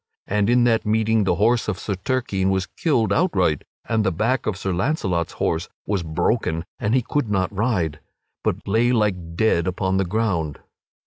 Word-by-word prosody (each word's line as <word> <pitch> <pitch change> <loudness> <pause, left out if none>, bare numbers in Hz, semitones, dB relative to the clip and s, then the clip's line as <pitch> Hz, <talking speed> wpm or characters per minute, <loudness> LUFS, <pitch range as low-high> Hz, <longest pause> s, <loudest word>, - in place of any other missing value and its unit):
And 105 +1 +1
in 120 0 +4
that 115 -2 +3
meeting 110 0 +2
the 95 - +2
horse 115 +5 +2
of 105 -4 -1
Sir 100 - -3
Turquine 95 -1 -1
was 95 -1 +1
killed 115 - 0
outright 95 - +1 0.2
and 110 -2 +1
the 95 - +1
back 115 +8 0
of 105 -3 -1
Sir 95 -2 -2
Launcelot's 95 - -1
horse 85 +1 -1 0.2
was 100 -3 0
broken 80 0 -1
and 110 +3 +1
he 130 - +2
could 145 -1 -1
not 95 -1 0
rise, 95 -9 0 0.4
but - - -2
lay 115 +4 +3
like 95 -8 0
dead 85 -4 +2
upon 95 +1 0
the 95 - +1
ground. 90 -7 -1
100 Hz, 180 wpm, -22 LUFS, 90-115 Hz, 0.4 s, in